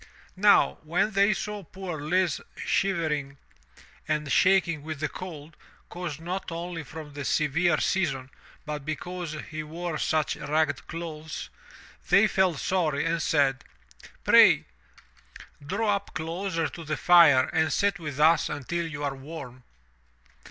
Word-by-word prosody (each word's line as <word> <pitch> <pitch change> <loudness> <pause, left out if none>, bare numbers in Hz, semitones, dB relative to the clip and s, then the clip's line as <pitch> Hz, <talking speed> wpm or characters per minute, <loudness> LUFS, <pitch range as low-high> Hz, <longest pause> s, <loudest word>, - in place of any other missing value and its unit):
Now, 205 +2 +4
when 170 +7 0
they 200 +1 +4
saw 210 +1 -3
poor 180 -3 -7
Lise 175 +2 +1 0.2
shiver 170 -5 0
ing 140 -1 -5 0.7
and 150 -2 -1
shaking 180 -2 +3
with 155 -1 -6
the 155 - 0
cold, 155 -3 -9 0.3
caused 175 -4 -5
not 180 +2 -5
only 170 0 -5
from 155 0 -10
the 145 0 -5
severe 155 +3 +1
season 135 -9 -1 0.3
but 150 -2 -5
because 165 +3 -5 0.2
he 155 0 -4
wore 165 +1 -5
such 155 -1 0
ragged 150 -1 -1
clothes, 160 -2 -6 0.6
they 195 +4 +6
felt 190 -6 +2
sorry 155 -5 0
and 165 0 0
said, 140 -4 +1 0.6
"Pray - - +6 1.0
draw 200 +6 0
up 200 - -13
closer 165 +1 -2
to 170 - -9
the 155 0 -3
fire 165 -7 +7
and 160 -2 +2
sit 200 +4 +1
with 150 -4 -6
us 160 +2 +4
until 170 +5 -3
you 145 -2 -6
are 140 -1 -2
warm. 135 -3 -9
160 Hz, 140 wpm, -27 LUFS, 150-180 Hz, 1.0 s, fire